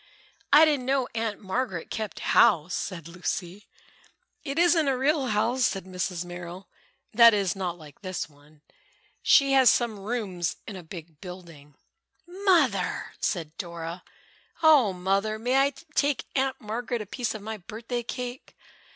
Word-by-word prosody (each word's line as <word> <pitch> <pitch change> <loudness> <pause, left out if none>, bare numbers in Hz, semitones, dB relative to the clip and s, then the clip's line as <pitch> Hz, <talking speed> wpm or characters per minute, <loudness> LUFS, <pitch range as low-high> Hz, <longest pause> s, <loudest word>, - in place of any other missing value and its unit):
"I 300 +3 +9
didn't 285 -5 0
know 265 -2 +1
Aunt 225 -2 -2
Margaret 190 -3 -3
kept 215 -2 -4
house," 170 +2 +4
said 170 -5 -4
Lucy. 175 +3 -5 0.8
"It 280 -1 -4
isn't 340 -3 +4
a 270 -2 +2
real 275 +1 +1
house," 230 +4 +1
said 195 -2 -1
Mrs. 180 -1 -3
Merrill, 175 +1 -8 0.5
"that 230 0 +8
is, 195 -3 0
not 180 -3 -3
like 150 -3 -15
this 185 -6 -4
one. 145 +1 -23 0.6
She 275 -2 +5
has 265 -2 +6
some 230 -4 +1
rooms 195 -5 -3
in 205 - -6
a 185 - -7
big 160 -2 -11
building." 170 -6 -11 0.5
"Mother!" 345 - +1
said 165 -5 -2
Dora, 170 0 -6 0.6
"oh, 290 -10 +6
Mother, 195 +4 0
may 245 +4 +1
I 280 - -5 0.2
take 285 -2 +1
Aunt 265 -1 0
Margaret 230 +2 -3
a - - -13
piece 235 +3 -3
of 210 - -8
my 220 +1 -5
birthday 230 +5 -5
cake?" 245 +1 -6
210 Hz, 150 wpm, -27 LUFS, 175-255 Hz, 0.8 s, I